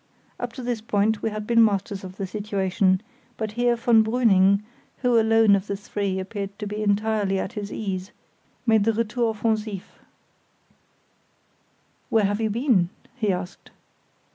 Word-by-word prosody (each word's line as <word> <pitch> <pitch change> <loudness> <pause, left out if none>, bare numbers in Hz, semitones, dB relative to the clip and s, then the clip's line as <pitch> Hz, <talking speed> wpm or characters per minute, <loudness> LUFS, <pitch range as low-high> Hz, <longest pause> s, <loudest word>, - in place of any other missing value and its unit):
Up 245 -1 -4
to 255 - -7
this 240 -2 -2
point 210 0 +1
we - - 0
had 215 0 -5
been 230 0 +5
masters 200 -2 0
of 185 0 -9
the 195 - -3
situation; 190 -2 0 0.4
but 220 -2 -3
here 240 +2 +2
von 230 -1 +4
Brüning, 205 -4 +3 0.4
who 245 -2 +4
alone 225 -2 +5
of 195 +1 -3
the 200 - -2
three 200 -1 -3
appeared 200 +1 -5
to 210 - -5
be 210 +1 -4
entirely 205 -1 +1
at 190 +3 -3
his 205 -3 -5
ease, 190 -3 -4 0.6
made 220 -3 +4
the 225 - +3
retour 230 +1 0
offensif. 215 -3 -1 2.3
"Where 220 -2 +3
have 205 +2 0
you 220 - +1
been?" 220 -6 +2 0.3
he 215 -6 0
asked. 180 0 -6
210 Hz, 155 wpm, -24 LUFS, 195-225 Hz, 2.3 s, been